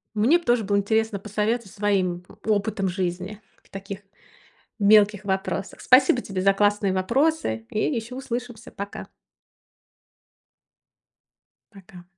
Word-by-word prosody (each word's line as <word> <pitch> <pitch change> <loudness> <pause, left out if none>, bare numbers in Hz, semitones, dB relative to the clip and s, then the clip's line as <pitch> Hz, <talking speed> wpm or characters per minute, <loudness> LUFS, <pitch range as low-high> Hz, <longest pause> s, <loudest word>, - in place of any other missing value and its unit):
Мне 240 +11 +4
б - - -17
тоже 240 -2 +2
было 200 0 +1
интересно 220 +1 0
посоветовать 210 +1 -2
своим 185 -4 -1 0.2
опытом 205 -2 0
жизни 185 +3 -4 0.2
в - - -27
таких 195 0 -7 0.8
мелких 210 0 +5
вопросах. 195 0 -3
Спасибо 255 -1 +5
тебе 190 -4 -4
за 195 +1 +4
классные 205 0 +2
вопросы! 190 - 0
И 215 - -3
ещё 240 -1 -2
услышимся. 240 -3 -6
Пока. 200 0 -7 2.7
Пока. 190 -3 -14
205 Hz, 115 wpm, -24 LUFS, 195-225 Hz, 2.7 s, мелких